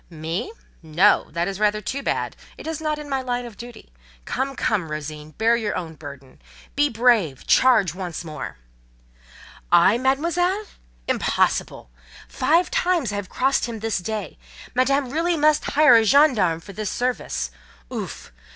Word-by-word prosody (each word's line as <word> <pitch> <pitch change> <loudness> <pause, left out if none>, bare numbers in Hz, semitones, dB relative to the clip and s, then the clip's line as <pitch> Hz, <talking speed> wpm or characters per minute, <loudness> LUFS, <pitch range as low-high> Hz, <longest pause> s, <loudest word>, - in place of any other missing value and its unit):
"Me? 165 - -4 0.3
No, 160 +2 +3
that 170 +2 -2
is 195 0 -4
rather 210 0 +2
too 265 +7 -4
bad! - - -2 0.2
It - - -10
is 320 -1 -4
not 305 -1 -1
in 300 -1 -8
my 270 -2 -1
line 245 -1 -3
of 235 -3 -10
duty. 235 - -12 0.3
Come, 270 +1 -2
come, 190 -10 -1
Rosine! 150 0 -7
bear 230 +1 +3
your 220 -3 -2
own 165 -3 -5
burden. 140 -4 -12 0.3
Be 290 +1 +3
brave—charge 220 - +3
once 175 -3 -5
more!" 155 - -7 1.1
"I, 175 +6 +5
Mademoiselle?—impossible! 285 - -1 0.4
Five 330 +9 +1
times 360 - +1
I - - -2
have 200 -2 -5
crossed 270 0 +1
him 230 -2 -6
this 220 -3 -1
day. 215 +3 -5 0.3
Madame 275 +3 +2
must 255 0 -9
really 310 -2 +2
hire 300 -2 +7
a 225 - +4
gendarme 220 - +4
for 200 - -11
this 210 0 -3
service. 240 - -2 0.4
Ouf! - - -6
225 Hz, 150 wpm, -23 LUFS, 170-275 Hz, 1.1 s, hire